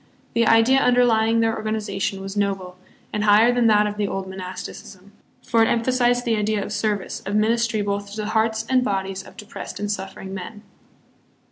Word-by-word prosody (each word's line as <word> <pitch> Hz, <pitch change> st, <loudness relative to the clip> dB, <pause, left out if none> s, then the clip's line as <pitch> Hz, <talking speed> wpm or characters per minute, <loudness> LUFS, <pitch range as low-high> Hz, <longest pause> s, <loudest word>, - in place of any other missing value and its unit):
The 230 Hz, -1 st, +2 dB
idea 225 Hz, +4 st, +5 dB
underlying 230 Hz, -3 st, +3 dB
their 225 Hz, 0 st, +1 dB
organization 210 Hz, -3 st, -3 dB
was 195 Hz, +1 st, -6 dB
noble, 195 Hz, -3 st, -2 dB, 0.4 s
and 210 Hz, -, -1 dB
higher 215 Hz, +3 st, +5 dB
than 245 Hz, -1 st, +3 dB
that 210 Hz, -1 st, +4 dB
of 210 Hz, 0 st, -3 dB
the 205 Hz, -1 st, 0 dB
old 195 Hz, -1 st, -3 dB
monasticism; 190 Hz, +1 st, -9 dB, 0.3 s
for 235 Hz, -3 st, +2 dB
it 225 Hz, -, +5 dB
emphasized 245 Hz, +1 st, +1 dB
the 230 Hz, -2 st, +2 dB
idea 210 Hz, -1 st, 0 dB
of 210 Hz, -, -6 dB
service, 210 Hz, -4 st, -2 dB
of 200 Hz, +2 st, -3 dB
ministry 225 Hz, 0 st, +1 dB
both 200 Hz, 0 st, -3 dB
to 205 Hz, -, -9 dB
the 210 Hz, -, -4 dB
hearts 220 Hz, 0 st, 0 dB
and 255 Hz, -1 st, +3 dB
bodies 195 Hz, -3 st, -2 dB
of -, -, -16 dB
depressed 210 Hz, +1 st, -8 dB
and 205 Hz, 0 st, -2 dB
suffering 190 Hz, -1 st, -6 dB
men. 205 Hz, +3 st, -8 dB
210 Hz, 180 wpm, -22 LUFS, 195-225 Hz, 0.4 s, idea